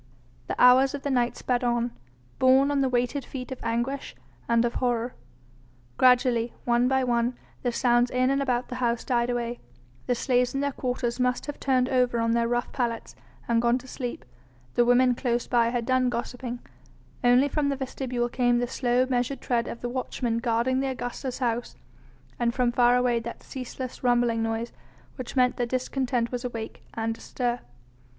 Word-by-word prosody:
The - - -4
hours 260 +3 +6
of 280 - -7
the 285 - -1
night 245 -2 +1
sped 250 0 -1
on, 240 0 +1 0.5
borne 265 +2 +5
on 280 -1 +1
the 265 - +2
weighted 250 +3 0
feet 255 0 -7
of 260 - -5
anguish 240 +4 -2 0.3
and 235 0 +4
of 235 - -1
horror. 245 -1 0 0.8
Gradually, 245 -2 +3
one 240 +1 +3
by 265 0 +2
one, 240 0 0 0.2
the 245 - 0
sounds 240 0 +3
in 255 +2 +2
and 275 0 +1
about 250 -2 -1
the 250 - -5
house 235 -1 +1
died 240 -1 +1
away; 240 0 -2 0.5
the 245 - +2
slaves 250 +1 +1
in - - 0
their 285 0 0
quarters 250 -2 -2
must 250 0 +1
have 290 - -6
turned 255 -2 +2
over 250 -2 +2
on 230 0 +1
their 235 0 +2
rough 240 +1 -1
pallets 235 -3 -3 0.3
and 230 -1 +2
gone 240 +1 +3
to 260 0 -11
sleep, 245 -2 -5 0.5
the 240 - +4
women 250 +1 +5
close 240 -1 -1
by 235 -2 +2
had 240 -1 -2
done 255 0 +2
gossiping, 245 0 -4 0.6
only 245 +3 +5
from 285 0 0
the 280 - 0
vestibule 255 -2 -2
came 245 0 +2
the 245 - +1
slow 245 0 +1
measured 250 +1 -1
tread 235 -2 0
of 235 - -7
the 245 - -3
watchmen 245 -2 -2
guarding 235 +2 +1
the 270 - 0
Augusta's 250 0 -4
house, 240 -2 -2 0.6
and 235 -1 +1
from 250 -2 +2
far 245 0 +4
away 250 -1 +2
that 235 +1 -8
ceaseless, 255 0 -7
rumbling 240 -2 +2
noise 225 +1 -2 0.4
which 255 0 -6
meant 250 -1 +3
that 240 -1 -1
discontent 255 -1 -1
was 245 -1 -3
awake 230 -3 -5
and 225 0 -2
astir. 245 -1 -2
245 Hz, 185 wpm, -26 LUFS, 240-255 Hz, 0.8 s, hours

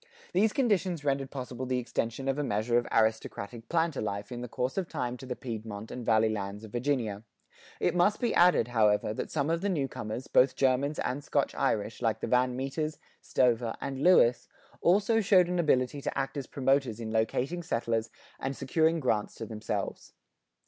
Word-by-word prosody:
These 210 +4 +3
conditions 190 - 0
rendered 135 -1 0
possible 130 -2 -5
the 130 0 0
extension 120 +1 -3
of 135 +1 0
a - - 0
measure 115 0 +1
of 120 - -6
aristocratic 110 0 -1
planter 165 -3 +1
life 100 0 -4
in 120 0 -5
the 125 - -5
course 125 +2 -2
of 190 -3 -2
time 125 -6 -3
to 130 - -10
the 125 - -3
Piedmont 110 -3 -6
and 125 - -6
Valley 110 -1 +3
lands 100 0 -4
of 110 - -10
Virginia. 120 -5 -1 0.6
It - - +1
must 180 +4 +3
be 240 - 0
added, 175 -9 +4
however, 105 -2 +2
that - - -4
some 150 +1 0
of 165 0 0
the 200 - 0
newcomers, 130 - -3
both 130 +1 +4
Germans 135 +3 +1
and 130 +3 -2
Scotch 140 -1 0
Irish, 110 -5 -1
like 110 -2 +1
the - - -3
Van 125 0 +2
Meters, 145 +4 -3 0.2
Stover, 120 -2 +1
and 135 -1 -4
Lewis, 145 -8 +5 0.3
also 210 +5 +3
showed 185 -3 +5
an 180 0 -1
ability 140 -3 +1
to - - -3
act 135 +1 -2
as 140 -3 -4
promoters 135 -4 +1
in 110 -1 -5
locating 125 +9 0
settlers 115 -7 -1 0.3
and 135 +1 -3
securing 160 +4 +2
grants 110 -5 0
to 115 - -6
themselves. 105 -2 -4
130 Hz, 185 wpm, -29 LUFS, 115-150 Hz, 0.6 s, Lewis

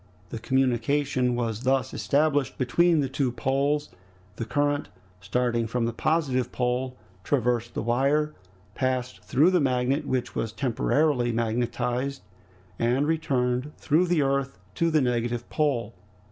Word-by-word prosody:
The 115 - -5
communication 130 +1 +1
was 115 -2 -2
thus 130 0 +1
established 145 -1 +1
between 160 +6 +3
the 135 - 0
two 135 -1 -1
poles; 140 +4 0 0.5
the 115 - -3
current, 145 +2 0 0.3
starting 115 +3 0
from 115 +1 -1
the 115 - -2
positive 135 -3 0
pole, 125 +1 -1 0.3
traversed 120 -2 0
the - - -2
wire, 140 +6 +1 0.4
passed 130 -1 -2
through 155 +8 +3
the 180 -3 +3
magnet 135 +2 +1
which 130 -1 -1
was 110 -1 -3
temporarily 130 0 +1
magnetized, 120 +3 -1 0.6
and 125 +5 +2
returned 140 -4 0
through 160 +4 +2
the 170 -4 +2
earth 135 0 -1 0.2
to 170 - +1
the 155 -2 +3
negative 120 -1 -1
pole. 130 -8 0
130 Hz, 130 wpm, -26 LUFS, 120-145 Hz, 0.6 s, between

